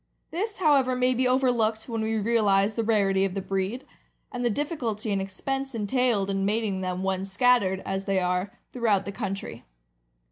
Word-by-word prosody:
This, 410 +6 -3
however, 280 -7 +3
may 250 0 +2
be 255 +1 +1
overlooked 240 -4 +1
when 230 -2 -3
we 220 0 -1
realize 210 -2 +2
the 230 - -1
rarity 200 -3 +2
of 195 -1 -1
the - - -1
breed, 195 +6 -3 0.5
and 245 0 -4
the 240 - +2
difficulty 235 -5 -2
and 195 -1 0
expense 270 +7 -4
entailed 225 -2 +1
in 195 0 -1
mating 205 -2 0
them 185 0 -3
when 190 0 -1
scattered, 195 -2 +2
as 195 0 -3
they 195 -1 +1
are, 180 +2 -1 0.2
throughout 215 -6 +1
the 200 - -4
country. 195 0 -5
215 Hz, 175 wpm, -26 LUFS, 195-250 Hz, 0.5 s, however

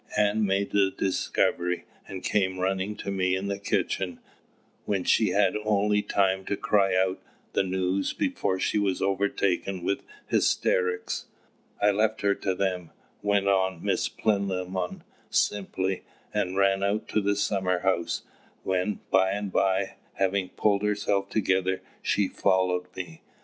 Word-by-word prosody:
Ann 105 0 +3
made 100 +1 0
the 100 -1 +4
discovery, 90 -2 0 0.2
and 95 -1 -7
came 95 -3 +1
running 95 +2 -1
to 100 - -5
me 95 -1 +1
in 95 +1 -3
the 100 0 -2
kitchen, 95 -2 -1 0.7
when 100 -3 0
she 110 - +3
had 100 0 +3
only 105 0 +2
time 95 -2 +1
to 100 - -1
cry 100 -6 +2
out 95 0 +1 0.3
the - - +3
news 95 0 0
before 235 - -1
she 105 - +1
was 95 -2 0
overtaken 95 -1 0
with 100 +2 0 0.2
hysterics. 90 -1 +1 0.5
I 105 - +4
left 110 +2 +1
her 100 0 +3
to 95 -1 -2
them," 90 -3 -1 0.3
went 100 -1 +2
on 95 -3 +1
Miss - - +1
Plinlimmon, 95 -3 -1 0.3
simply, 95 -2 0 0.3
"and 90 +1 -1
ran 100 0 +3
out 100 +2 0
to 105 - +1
the 100 +1 +1
summer 95 -3 0
house, 85 -3 0 0.4
when 95 +2 -1
by 95 0 +4
and 100 -1 -3
by, 95 0 +1 0.2
having 95 -1 0
pulled 100 -2 +1
herself 100 -1 0
together, 95 -3 +1 0.2
she 100 -2 +1
followed 90 -2 +1
me. 90 -3 -7
95 Hz, 145 wpm, -27 LUFS, 95-100 Hz, 0.7 s, the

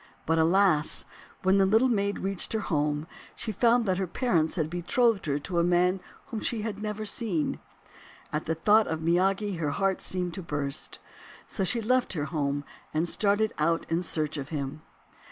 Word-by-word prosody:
But 165 +1 +2
alas! 165 -2 +3 0.4
when 190 +1 +4
the 195 - +5
Little 220 +6 +4
Maid 200 -4 0
reached 195 +1 -1
her 220 - +1
home 150 -3 0 0.3
she 225 - -4
found 235 +3 +3
that 185 -2 0
her 190 - -1
parents 170 -6 +1
had 160 -4 0
betrothed 190 +5 +1
her 140 -1 +1
to 170 +4 -2
a - - +3
man 180 +2 +3 0.3
whom 225 -4 -5
she 220 0 -1
had 210 -2 -4
never 215 0 -3
seen. 205 - -1 0.7
At 150 +1 -2
the 160 - 0
thought 210 +6 +4
of 160 0 -3
Miyagi 190 +3 +1
her 150 -3 0
heart 195 +5 0
seemed 180 -2 -1
to 190 - -5
burst. 145 -4 -3 0.5
So - - -3
she 230 +5 +1
left 250 +1 +2
her 150 -5 -2
home, 145 -3 -1 0.3
and 160 +3 0
started 205 +4 +1
out 165 +2 +1
in 165 +1 +2
search 155 -3 -2
of 140 -1 -5
him. 145 -1 -4
180 Hz, 185 wpm, -28 LUFS, 160-210 Hz, 0.7 s, the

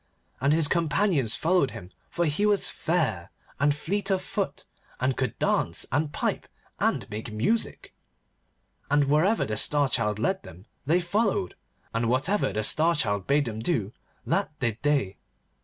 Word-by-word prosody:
And 140 +3 +2
his 160 -1 +4
companions 160 - +2
followed 170 -4 +2
him, 90 -4 -10 0.2
for 170 - 0
he 155 +6 0
was 210 -1 +3
fair, 155 - -1 0.3
and 140 +1 +3
fleet 195 +6 -1
of 190 -1 +1
foot, - - -3 0.3
and 130 +1 +1
could 130 -4 -2
dance, 85 -1 +1
and 145 +3 0
pipe, - - -2 0.3
and - - 0
make 110 +1 -5
music. 120 - -1 1.0
And 145 0 +4
wherever 155 +10 +2
the 110 0 -3
Star 145 +4 +3
Child 105 -5 0
led 190 - 0
them 90 - -13 0.2
they 170 +4 +3
followed, 195 - 0 0.4
and 115 0 0
whatever 140 - +1
the 105 +2 -2
Star 160 +9 +3
Child 100 - -1
bade 145 +1 +3
them 110 -2 -5
do, 110 - -1 0.3
that 150 - -1
did 115 -4 -2
they. 140 -10 +1
145 Hz, 155 wpm, -26 LUFS, 110-170 Hz, 1.0 s, his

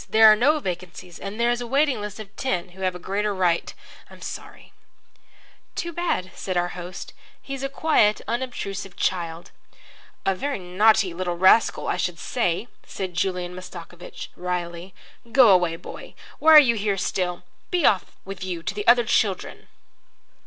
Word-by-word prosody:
There 220 0 +6
are - - +6
no 280 +8 +3
vacancies, 180 - -6
and 200 +3 -7
there 235 +1 +3
is 240 0 -1
a 240 - -5
waiting 275 -2 +2
list 210 +1 -6
of 210 -1 -10
ten 185 -9 -2
who 185 +2 -14
have 185 -1 0
a - - -4
greater 200 +3 -2
right 175 -3 +1 0.4
I'm - - -14
sorry." - - -9 1.0
"Too 340 0 -4
bad," 315 - -1
said 185 -2 -4
our 175 0 +1
host. 180 +1 -8 0.3
"He's 275 -1 -7
a 275 - -2
quiet, 275 -8 +3
unobtrusive 200 -6 -4
child." 170 -2 -2 0.7
"A 195 - +3
very 280 +9 -3
naughty 190 +1 +3
little 175 0 -3
rascal, 190 +5 +4
I - - 0
should - - -2
say," 220 -2 -1 0.2
said 185 -2 -6
Julian 180 0 -2
Mastakovich, 180 -1 -9
wryly. 180 0 -4 0.4
"Go 250 -2 +7
away, 180 -3 +4
boy. - - -10 0.2
Why 320 0 +7
are - - +13
you 255 -5 +4
here 205 -2 -1
still? 180 -1 -2 0.3
Be 355 -4 +1
off 190 -3 +4 0.2
with 195 -1 -7
you 175 -3 -4
to 190 - -3
the 205 0 -5
other 240 0 +6
children." 205 -4 0
195 Hz, 165 wpm, -24 LUFS, 180-230 Hz, 1.0 s, are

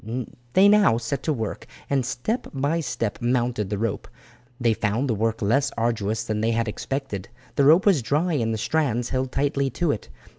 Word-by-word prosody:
They 195 +2 +6
now 205 - +5
set 120 +3 -3
to 155 - -1
work, 110 -7 -4 0.2
and 140 -2 +1
step 215 - -2
by 145 +5 0
step 115 -8 -3
mounted 120 -4 0
the 105 - -2
rope. 110 0 -2 0.5
They 120 -2 +3
found 110 +5 0
the 120 - +1
work 110 +1 -1
less 140 +7 +2
arduous 110 -2 0
than 110 -1 -2
they 110 - +1
had 115 0 0
expected. 120 -3 -4 0.3
The 140 - +3
rope 160 +6 +6
was 190 -9 +4
dry, 150 +9 0
and 115 -6 0
the 110 - -1
strands 125 -2 0
held 130 0 -1
tightly 140 0 0
to 160 +5 0
it. 105 - -5
120 Hz, 190 wpm, -24 LUFS, 110-140 Hz, 0.5 s, They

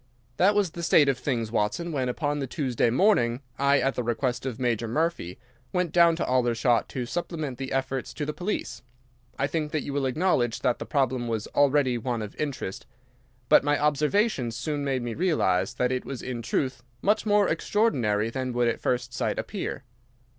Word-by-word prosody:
"That 200 +3 +4
was 200 -5 +2
the 170 - -7
state 155 -3 +5
of 135 - 0
things, 115 -6 -2
Watson, 115 +10 -1
when 130 -4 -1
upon 145 +3 -1
the 135 - -3
Tuesday 125 -4 0
morning 125 - +3 0.2
I, 140 0 +4
at 135 - +1
the - - -2
request 120 +2 -1
of 130 -1 -5
Major 120 -2 0
Murphy, 150 - -1 0.3
went 180 -3 0
down 170 -1 +5
to 165 - -2
Aldershot 120 -1 +2
to 125 -2 -3
supplement 150 -1 -4
the 135 -1 -4
efforts 135 +1 -3
of 150 - -1
the 150 - -3
police. 175 - -3 0.6
I 140 - +1
think 150 +1 -2
that 155 - 0
you 140 - -5
will 140 -1 0
acknowledge 130 -5 +1
that 125 -2 +1
the - - -6
problem 130 -4 0
was 115 -2 -2
already 140 -3 +2
one 120 -1 -2
of 105 - -8
interest, 140 -10 -4 0.6
but - - +6
my 145 0 +2
observations 150 - +1
soon 145 +3 -3
made 135 -3 -1
me 120 -1 -3
realize 125 - +1
that 125 0 +1
it 130 0 -1
was 135 -3 -6
in 125 -2 -4
truth 130 +2 -1 0.2
much 210 +2 +2
more 205 -2 +4
extraordinary 120 - +1
than 130 0 -3
would 120 0 +2
at 115 - -1
first 125 0 -1
sight - - -1
appear. 190 -9 -4
135 Hz, 190 wpm, -26 LUFS, 120-155 Hz, 0.6 s, but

